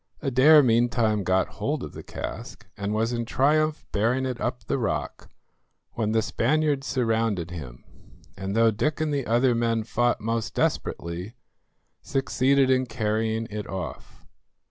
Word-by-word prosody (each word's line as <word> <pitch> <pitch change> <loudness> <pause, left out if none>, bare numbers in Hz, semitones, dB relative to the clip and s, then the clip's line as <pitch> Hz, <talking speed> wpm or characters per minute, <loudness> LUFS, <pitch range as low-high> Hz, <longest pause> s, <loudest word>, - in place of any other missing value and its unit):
Adair 145 +3 +6
meantime 115 -3 +2
got 95 0 +2
hold - - -3
of - - -7
the - - -8
cask, - - -7
and 100 0 -3
was 110 +3 0
in 120 0 -1
triumph 150 +5 +1
bearing 120 +6 +1
it 125 -2 -4
up 125 -1 -2
the 130 - -1
rock, 115 - -3 0.6
when 110 -2 -1
the 110 0 +2
Spaniards 145 +4 0
surrounded 115 -8 0
him, 65 -8 -8 0.5
and, 95 +1 -4
though 115 0 +5
Dick 150 +10 -1
and 155 -1 0
the 140 -3 -2
other 120 +3 +3
men 115 -1 0
fought 120 +2 0
most 115 +1 -2
desperately, 90 +7 -2 0.7
succeeded 135 0 +2
in 130 0 +2
carrying 110 0 -1
it 105 -1 -5
off. 95 -1 -7
115 Hz, 145 wpm, -25 LUFS, 110-130 Hz, 0.7 s, Adair